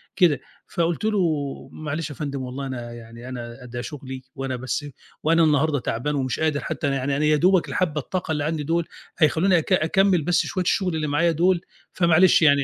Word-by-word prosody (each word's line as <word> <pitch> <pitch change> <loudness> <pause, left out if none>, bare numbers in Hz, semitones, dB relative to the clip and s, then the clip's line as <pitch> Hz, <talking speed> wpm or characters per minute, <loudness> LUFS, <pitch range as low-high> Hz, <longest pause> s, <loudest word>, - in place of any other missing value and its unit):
كده، 165 - +4 0.3
فقُلت 170 +4 -1
له: 215 -2 +2 0.5
"معلش 155 0 -4
يا 145 - -8
فندم 140 -3 -4
والله 130 +2 -5
أنا 120 -2 -6
يعني 115 +1 -10
أنا 120 0 -7
ده 120 0 -5
شُغلي 130 -1 -7
وأنا 135 -1 -3
بس 130 +4 -3 0.4
وأنا 165 +1 +4
النهارده 150 -1 +3
تعبان 135 +6 -2
ومش 130 -2 -1
قادر 155 -2 +1
حتى 145 - -3
أنا 140 - +1
يعني 140 +1 -1
أنا 150 - +1
يا 150 0 +4
دوبك 180 +3 +3
الحبّة 155 -4 0
الطاقة 180 +2 -3
اللي 150 -2 0
عندي 155 -1 -1
دُول 165 +2 0 0.3
هيخلّوني 170 +4 +4
أك 165 +4 0
أكمل 185 +1 +3
بس 175 +3 +2
شوية 185 -2 -2
الشُغل 180 -1 +1
اللي 155 -1 -1
معايا 165 +4 +2
دُول 175 +2 +2 0.3
فمعلش 170 0 +5
يعني" 140 -3 +5
150 Hz, 195 wpm, -24 LUFS, 135-170 Hz, 0.5 s, فمعلش